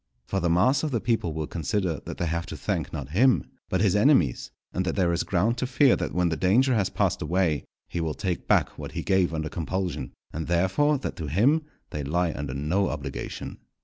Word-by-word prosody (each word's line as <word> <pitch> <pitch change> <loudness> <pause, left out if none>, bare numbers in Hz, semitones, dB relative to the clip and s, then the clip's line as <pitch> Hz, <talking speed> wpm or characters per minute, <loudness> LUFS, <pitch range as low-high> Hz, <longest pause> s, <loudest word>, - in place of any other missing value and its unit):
For 95 - -1
the 85 - 0
mass 105 +12 +3
of 155 - -1
the 120 -5 0
people 110 -7 0
will 80 0 -3
consider 85 +2 -1
that - - -6
they 85 - -1
have 85 +1 -2
to - - -6
thank 85 -9 -2
not 70 -4 -5
him, 125 - +4 0.3
but 95 - +1
his 105 -3 +3
enemies, 105 - +3 0.2
and 90 - 0
that 90 - -2
there 90 -3 +2
is 85 - +1
ground 105 +7 +1
to 130 - -1
fear 135 0 +4
that - - -3
when 90 -1 +1
the 80 - 0
danger 120 +10 +3
has 100 -5 +1
passed - - 0
away, 85 -4 +1 0.2
he 85 - -3
will 80 -2 -2
take 90 -3 -3
back - - +2
what - - -7
he - - -3
gave 95 -3 +2
under 80 -1 -2
compulsion, 85 -5 -3 0.2
and, 80 +1 -4
therefore, 95 - +2
that 130 - -5
to 80 - -4
him 130 - +3 0.3
they 75 - -3
lie 85 +3 0
under 70 -2 -4
no 85 +8 +1
obligation. 70 -3 -5
90 Hz, 220 wpm, -26 LUFS, 80-105 Hz, 0.3 s, him